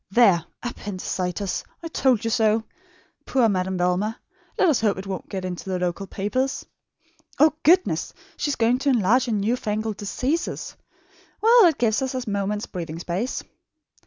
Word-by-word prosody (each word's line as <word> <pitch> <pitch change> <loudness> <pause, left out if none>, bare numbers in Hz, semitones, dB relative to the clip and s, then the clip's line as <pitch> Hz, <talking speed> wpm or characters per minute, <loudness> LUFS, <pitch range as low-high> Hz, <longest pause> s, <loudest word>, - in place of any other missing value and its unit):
There! 195 -6 +5 0.2
APPENDICITIS! 190 -4 -3 0.2
I - - -3
told 260 -8 +2
you 225 - 0
so. 220 -1 +2 0.6
Poor 255 -4 +3
Madame 190 -2 0
Velma! 180 +5 0 0.4
Let 365 - +4
us 285 - +2
hope 210 -4 +2
it 190 - -6
won't 190 -2 -5
get 190 -1 -4
into 180 +1 -5
the 185 - 0
local 180 +2 -2
papers. 255 +9 -2 0.7
Oh, 305 0 +5
goodness! 360 +3 +3 0.2
She - - -2
is 285 - 0
going 235 +2 +2
to 280 +1 +1
enlarge 245 +1 +3
on 215 - +1
new 225 +5 +1
fangled 215 -2 -3
diseases. 260 - -2 0.6
Well, 460 0 +7
it 325 -4 +4
gives 225 -1 +1
us 265 0 -2
a 255 -2 -3
moment's 205 +1 -1
breathing 165 -3 -6
space.... 180 +8 -3
215 Hz, 160 wpm, -24 LUFS, 190-255 Hz, 0.7 s, Well